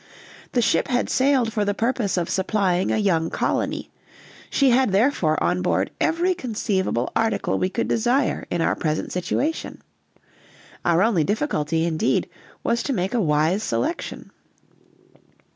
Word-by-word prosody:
The 245 - +2
ship 200 - +2
had 245 -2 0
sailed 260 -4 +2
for 210 -3 +1
the 205 0 -1
purpose 225 -4 0
of 170 -2 0
supplying 190 -1 0
a - - +1
young 170 -6 +1
colony, - - -2 0.6
she 275 -2 +3
had 255 -2 +3
therefore 195 - +2
on 180 +1 +1
board 180 - 0
every 345 +3 +2
conceivable 200 - -2
article 225 -1 0
we 185 - +1
could 230 +5 -2
desire 245 +4 +1
in 175 - -1
our - - +1
present 155 0 -2
situation; 260 - -2 1.0
our 170 +2 +3
only 210 -8 +2
difficulty, 165 - 0
indeed, 155 -1 0 0.4
was 235 0 +1
to 280 - -2
make 190 -1 -1
a 240 - +2
wise 155 +4 +2
selection. 325 +8 -3
205 Hz, 145 wpm, -23 LUFS, 175-245 Hz, 1.0 s, she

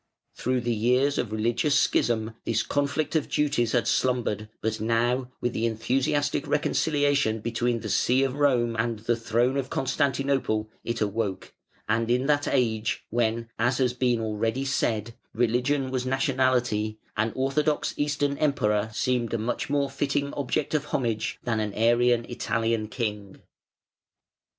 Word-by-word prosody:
Through 125 0 -1
the 120 0 0
years 125 +6 +2
of 120 - -2
religious 120 +7 +1
schism 110 -1 +1
this 115 -1 0
conflict 145 +3 -1
of 155 - +1
duties 140 -6 +1
had 120 - +2
slumbered, 110 -4 0
but 110 0 -2
now, 120 +3 +1
with 120 - -1
the 115 +1 0
enthusiastic 135 +6 0
reconciliation 145 -6 +1
between 115 +1 -1
the - - -5
see 130 +2 +3
of 135 -1 0
Rome 125 -5 +2
and 115 0 0
the 115 +3 0
throne 120 +3 +1
of 135 -1 -2
Constantinople, 135 -5 0
it 115 -1 -3
awoke; 105 -2 -2 0.3
and 115 +1 +1
in 125 +2 +2
that 145 0 +2
age 110 -4 0
when, 115 0 0
as 120 +2 +2
has 125 -2 +1
been 125 -1 +1
already 110 +4 -1
said, 115 -4 -1 0.2
religion 125 +4 +1
was 130 -1 -1
nationality, 130 -5 +1 0.2
an 110 +1 0
orthodox 145 +3 0
Eastern 145 -1 0
emperor 105 -8 +1
seemed 120 +1 0
a - - +1
much 115 +5 -2
more 140 -1 +1
fitting 140 +1 -1
object 145 +2 -2
of 150 -2 +1
homage 115 -6 -1
than 115 -3 0
an 105 -2 -3
Arian 120 +1 +3
Italian 115 -2 -1
king. 105 -4 -4
120 Hz, 145 wpm, -26 LUFS, 110-135 Hz, 0.3 s, see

